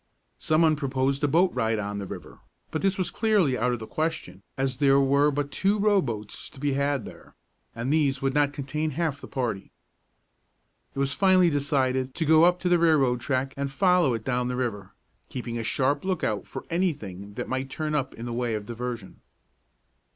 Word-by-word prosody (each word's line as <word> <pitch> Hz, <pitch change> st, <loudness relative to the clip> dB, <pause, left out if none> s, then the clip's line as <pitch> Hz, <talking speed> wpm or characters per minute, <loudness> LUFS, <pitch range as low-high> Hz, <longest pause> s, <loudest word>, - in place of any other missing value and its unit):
Some 155 Hz, +1 st, +2 dB
one 155 Hz, -1 st, +4 dB
proposed 135 Hz, 0 st, -1 dB
a -, -, +4 dB
boat 175 Hz, +5 st, +3 dB
ride 115 Hz, -2 st, 0 dB
on 100 Hz, -1 st, -3 dB
the 100 Hz, -, -5 dB
river; -, -, -9 dB, 0.3 s
but 155 Hz, -, -2 dB
this 195 Hz, 0 st, +1 dB
was 180 Hz, -2 st, -1 dB
clearly 205 Hz, -, +2 dB
out 125 Hz, +1 st, +1 dB
of 120 Hz, -, -1 dB
the 110 Hz, -, -7 dB
question, 160 Hz, -, -3 dB, 0.2 s
as 135 Hz, -1 st, -1 dB
there 140 Hz, 0 st, +4 dB
were 140 Hz, +2 st, +4 dB
but 145 Hz, 0 st, -2 dB
two 195 Hz, +9 st, +1 dB
row 205 Hz, -1 st, +3 dB
boats 110 Hz, -, -5 dB
to -, -, -15 dB
be 145 Hz, 0 st, 0 dB
had 140 Hz, -3 st, 0 dB
there, -, -, -13 dB, 0.4 s
and 120 Hz, +5 st, -1 dB
these 140 Hz, -4 st, +2 dB
would 135 Hz, -1 st, 0 dB
not 145 Hz, 0 st, +2 dB
contain 145 Hz, +2 st, -3 dB
half 165 Hz, -4 st, +1 dB
of -, -, -19 dB
the -, -, -9 dB
party. 115 Hz, -7 st, -3 dB, 1.3 s
It -, -, -11 dB
was 140 Hz, 0 st, 0 dB
finally 185 Hz, -2 st, +4 dB
decided 130 Hz, -2 st, 0 dB
to 165 Hz, -, -1 dB
go 160 Hz, +2 st, +6 dB
up 180 Hz, 0 st, +4 dB
to 180 Hz, -, -1 dB
the 175 Hz, -1 st, +4 dB
railroad 140 Hz, -7 st, +3 dB
track 135 Hz, +1 st, -1 dB
and 140 Hz, 0 st, -2 dB
follow 175 Hz, -3 st, +3 dB
it 110 Hz, -, -6 dB
down 125 Hz, -1 st, 0 dB
the 125 Hz, -, -2 dB
river, 105 Hz, -6 st, -4 dB, 0.3 s
keeping 120 Hz, -2 st, -4 dB
a -, -, -3 dB
sharp 140 Hz, +5 st, +1 dB
lookout 180 Hz, -, -1 dB
for -, -, -7 dB
anything 105 Hz, -, -2 dB
that 125 Hz, -, -4 dB
might 130 Hz, +1 st, -3 dB
turn 155 Hz, +2 st, -3 dB
up 135 Hz, -3 st, -1 dB
in 115 Hz, -, -7 dB
the 120 Hz, -, -4 dB
way 120 Hz, -1 st, -1 dB
of 105 Hz, -1 st, -5 dB
diversion. 120 Hz, -3 st, -6 dB
135 Hz, 205 wpm, -26 LUFS, 125-155 Hz, 1.3 s, go